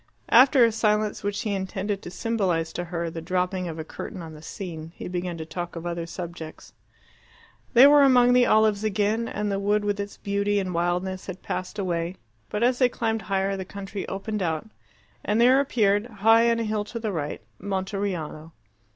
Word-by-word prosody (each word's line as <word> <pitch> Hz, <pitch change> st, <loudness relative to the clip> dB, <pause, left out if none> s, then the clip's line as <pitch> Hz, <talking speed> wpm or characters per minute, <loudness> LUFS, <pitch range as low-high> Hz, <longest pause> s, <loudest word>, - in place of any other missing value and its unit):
After 255 Hz, +1 st, +7 dB
a 230 Hz, -, +2 dB
silence, 215 Hz, -1 st, +1 dB
which 205 Hz, 0 st, -2 dB
he 210 Hz, -, -2 dB
intended 195 Hz, +1 st, -3 dB
to -, -, -8 dB
symbolize 180 Hz, -5 st, -1 dB
to 175 Hz, -, -3 dB
her 170 Hz, -1 st, -3 dB
the 165 Hz, -, -6 dB
dropping 180 Hz, +1 st, -1 dB
of 165 Hz, -1 st, -6 dB
a 160 Hz, -, -4 dB
curtain 160 Hz, -, -8 dB
on 160 Hz, -1 st, -9 dB
the 150 Hz, -, -12 dB
scene, 165 Hz, -1 st, -7 dB
he -, -, -7 dB
began 180 Hz, -1 st, -3 dB
to 160 Hz, -, -6 dB
talk 175 Hz, +2 st, -6 dB
of 165 Hz, 0 st, -6 dB
other 170 Hz, -1 st, -3 dB
subjects. 170 Hz, -2 st, -8 dB, 1.0 s
They 245 Hz, +3 st, +10 dB
were 290 Hz, 0 st, +7 dB
among 250 Hz, -2 st, +6 dB
olives 215 Hz, -2 st, +3 dB
again, 215 Hz, +2 st, 0 dB
and 210 Hz, -1 st, -2 dB
the 195 Hz, -, -1 dB
wood 205 Hz, +1 st, +1 dB
with 205 Hz, 0 st, -1 dB
its 200 Hz, 0 st, -5 dB
beauty 200 Hz, 0 st, 0 dB
and 185 Hz, -2 st, -3 dB
wildness 180 Hz, +2 st, -1 dB
had 190 Hz, -1 st, -7 dB
passed 185 Hz, +3 st, -4 dB
away. 175 Hz, -2 st, -2 dB, 0.3 s
But 210 Hz, -, -1 dB
as 245 Hz, +1 st, +2 dB
they 250 Hz, -2 st, +5 dB
climbed 225 Hz, -2 st, -1 dB
higher 195 Hz, 0 st, -1 dB
the 190 Hz, -, -4 dB
country 195 Hz, +1 st, -7 dB
opened 205 Hz, +2 st, -4 dB
out, 165 Hz, +2 st, -1 dB, 0.6 s
and 210 Hz, +2 st, +1 dB
there 255 Hz, +3 st, +6 dB
appeared, 215 Hz, -6 st, +2 dB
high 225 Hz, +1 st, +4 dB
on 230 Hz, -, +2 dB
a 230 Hz, -, -1 dB
hill 215 Hz, -1 st, -1 dB
to 225 Hz, +3 st, -7 dB
the 220 Hz, -2 st, -2 dB
right, 150 Hz, -5 st, -3 dB, 0.2 s
Monteriano. 190 Hz, -5 st, -3 dB
200 Hz, 195 wpm, -25 LUFS, 175-215 Hz, 1.0 s, They